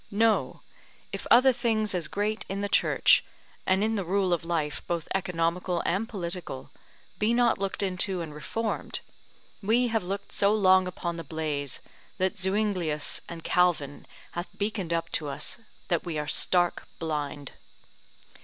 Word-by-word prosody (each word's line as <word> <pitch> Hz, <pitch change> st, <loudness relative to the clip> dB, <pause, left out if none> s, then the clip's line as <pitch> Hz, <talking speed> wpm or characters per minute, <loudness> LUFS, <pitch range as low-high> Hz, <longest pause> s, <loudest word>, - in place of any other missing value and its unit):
No, 220 Hz, +2 st, +2 dB, 0.5 s
if -, -, -5 dB
other 255 Hz, +2 st, +7 dB
things 220 Hz, -4 st, 0 dB
as 175 Hz, -4 st, -1 dB
great 210 Hz, +2 st, -1 dB
in 195 Hz, +1 st, -2 dB
the 205 Hz, -, 0 dB
Church, -, -, +5 dB, 0.4 s
and 190 Hz, +2 st, +3 dB
in 220 Hz, +1 st, +1 dB
the 200 Hz, -3 st, -1 dB
rule 185 Hz, +1 st, +1 dB
of 170 Hz, -, -1 dB
life 155 Hz, -5 st, -1 dB
both 170 Hz, -2 st, -2 dB
economical 175 Hz, -1 st, 0 dB
and 200 Hz, +7 st, 0 dB
political, 175 Hz, -, -5 dB, 0.5 s
be 220 Hz, +3 st, +2 dB
not 240 Hz, -4 st, +3 dB
looked 195 Hz, +1 st, -2 dB
into 185 Hz, 0 st, +1 dB
and 160 Hz, -3 st, -5 dB
reformed, 220 Hz, +9 st, -3 dB, 0.6 s
we 235 Hz, +4 st, +3 dB
have 225 Hz, -1 st, +1 dB
looked 195 Hz, +2 st, -5 dB
so 200 Hz, +1 st, +3 dB
long 185 Hz, -2 st, +5 dB
upon 175 Hz, -1 st, -4 dB
the 165 Hz, -, -5 dB
blaze 150 Hz, -5 st, -3 dB, 0.4 s
that 185 Hz, 0 st, +1 dB
Zuinglius 185 Hz, -6 st, 0 dB
and 165 Hz, -1 st, -7 dB
Calvin 170 Hz, -6 st, +1 dB, 0.2 s
hath 175 Hz, +1 st, -4 dB
beaconed 200 Hz, -4 st, -2 dB
up 165 Hz, 0 st, -1 dB
to 155 Hz, -, 0 dB
us, 140 Hz, +10 st, -3 dB, 0.3 s
that 170 Hz, -3 st, +1 dB
we 165 Hz, -3 st, -3 dB
are 150 Hz, 0 st, -2 dB
stark 175 Hz, +3 st, +2 dB
blind. 145 Hz, -3 st, -3 dB
180 Hz, 155 wpm, -28 LUFS, 165-205 Hz, 0.6 s, other